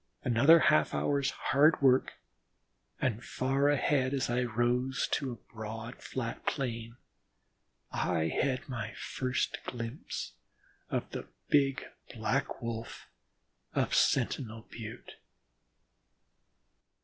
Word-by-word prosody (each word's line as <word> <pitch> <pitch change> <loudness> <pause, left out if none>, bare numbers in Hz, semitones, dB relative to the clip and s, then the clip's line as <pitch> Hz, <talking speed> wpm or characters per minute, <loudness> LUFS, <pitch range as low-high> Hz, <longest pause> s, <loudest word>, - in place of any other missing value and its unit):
Another 130 +7 +7
half 75 - +4
hour's 140 - +1
hard 150 +4 +3
work 130 -2 +4 0.9
and 120 -2 0
far 135 +4 +1
ahead, 140 -1 +2
as 135 -3 0
I 125 +1 +2
rose 125 +2 +1
to 135 -2 0
a 120 - -12
broad 115 +2 -6
flat 120 -3 -4
plain, 115 -3 -2 0.9
I 80 -2 0
had 130 - 0
my 115 -4 -4
first 130 -1 -2
glimpse 120 +2 -5 0.6
of - - -1
the - - -5 0.2
Big 135 -2 +3 0.3
Black 120 +4 -1
Wolf 115 0 -5 0.7
of - - +1
Sentinel 110 -3 +1
Butte. 115 +1 -8
125 Hz, 100 wpm, -31 LUFS, 115-135 Hz, 0.9 s, Another